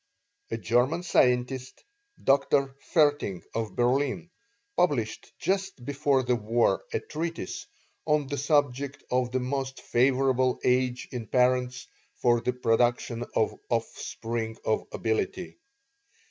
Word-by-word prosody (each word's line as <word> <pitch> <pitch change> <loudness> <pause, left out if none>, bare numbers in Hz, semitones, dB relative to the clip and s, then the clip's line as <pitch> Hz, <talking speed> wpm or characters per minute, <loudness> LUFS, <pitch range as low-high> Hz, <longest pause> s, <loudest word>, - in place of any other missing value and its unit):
A 115 - -2
German 120 - +1
scientist, 125 -4 +1 0.4
Dr. 135 0 +3 0.2
Vaerting, 145 - +2
of 110 -4 -3
Berlin, 135 +7 +1 0.4
published 140 -12 0
just 190 -9 -2
before 140 -1 +1
the 125 0 +2
War 115 -2 +1
a - - 0
treatise 165 - -5 0.4
on 150 -1 +3
the 145 +1 -3
subject 140 -1 +1
of 125 -1 +1
the 130 - +1
most 135 +1 -3
favorable 130 0 +2
age 125 0 +1
in 120 -3 -5
parents 125 +1 +2 0.3
for 120 -1 +2
the 125 - 0
production 120 0 +1
of 110 - +2 0.2
offspring 115 -1 -3
of 110 - 0
ability. 115 - -2
125 Hz, 115 wpm, -28 LUFS, 120-140 Hz, 0.4 s, Dr